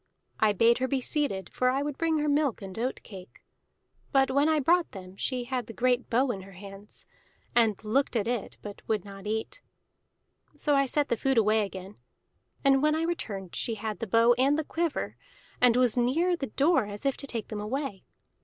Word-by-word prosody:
I 215 -1 +4
bade 230 +4 +4
her 260 - 0
be 275 0 0
seated, 255 - -1
for 255 - +2
I 270 +2 0
would 290 -1 -3
bring 325 0 +1
her 300 0 0
milk 285 -7 +1
and 190 -1 -8
oat 250 +3 -2
cake; 190 -3 -12 0.7
but 270 -1 +3
when 285 +3 +3
I 310 -1 +3
brought 340 +5 +2
them 185 -2 -10
she 250 +4 -2
had 250 -1 -3
the 225 - -8
great 250 +1 +1
bow 250 +3 +2
in 195 -4 -5
her 195 +1 -13
hands, 195 +2 -8 0.5
and 225 -4 +4
looked 255 +5 +1
at 220 - +1
it 240 -2 -3
but 205 -1 -8
would 215 -4 0
not 195 0 -9
eat. 220 - -3 1.0
So 295 - +1
I 275 -1 +3
set 290 +2 0
the 235 - +1
food 270 +2 +1
away 215 0 +4
again; 190 +1 -10 0.7
and 270 -1 +5
when 305 +1 +3
I 320 - 0
returned 205 - -4
she 230 - -2
had 215 -2 -4
the 230 - -4
bow 230 +4 +5
and 275 +3 +4
the 315 - 0
quiver, 330 +1 -2 0.4
and 245 -1 +5
was 250 -3 +3
near 305 +9 +2
the 275 -5 -4
door 275 0 +2
as 205 +4 -7
if 275 - +2
to 280 - -6
take 230 -5 -4
them 210 -2 -4
away. 230 -2 -4
245 Hz, 210 wpm, -28 LUFS, 210-280 Hz, 1.0 s, and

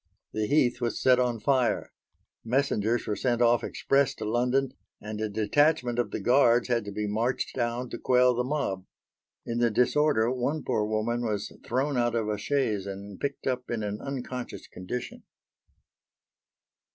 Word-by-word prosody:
The 110 0 -1
heath 125 -3 +2
was 120 -1 -1
set 130 -1 +4
on 120 -2 0
fire. 125 -4 +1 0.5
Messengers 120 -2 0
were 105 - -1
sent 120 +3 0
off 120 0 +4
express 140 0 +1
to 110 - -6
London, 125 +4 +1 0.3
and 105 0 -6
a 110 - -1
detachment 120 +4 +2
of 120 - 0
the - - -4
guards 120 -2 +4
had 115 -3 +1
to 100 - -5
be 105 +1 -3
marched 115 +5 -1
down 120 0 -1
to - - -5
quell 125 0 +4
the 125 +1 0
mob. 125 -9 -2 0.6
In 115 0 -2
the 120 -1 +3
disorder 125 +1 +2
one 135 +4 -1
poor 105 - 0
woman 110 +3 -1
was 105 -3 -2
thrown 135 +3 -1
out 120 -1 +1
of 110 -2 0
a 105 -1 -2
chaise 105 -5 0
and 100 0 -7
picked 140 -1 -4
up 125 -1 -2
in 115 -3 -2
an 105 0 -4
unconscious 125 -2 -5
condition. 105 +7 -6
120 Hz, 165 wpm, -28 LUFS, 110-130 Hz, 0.6 s, set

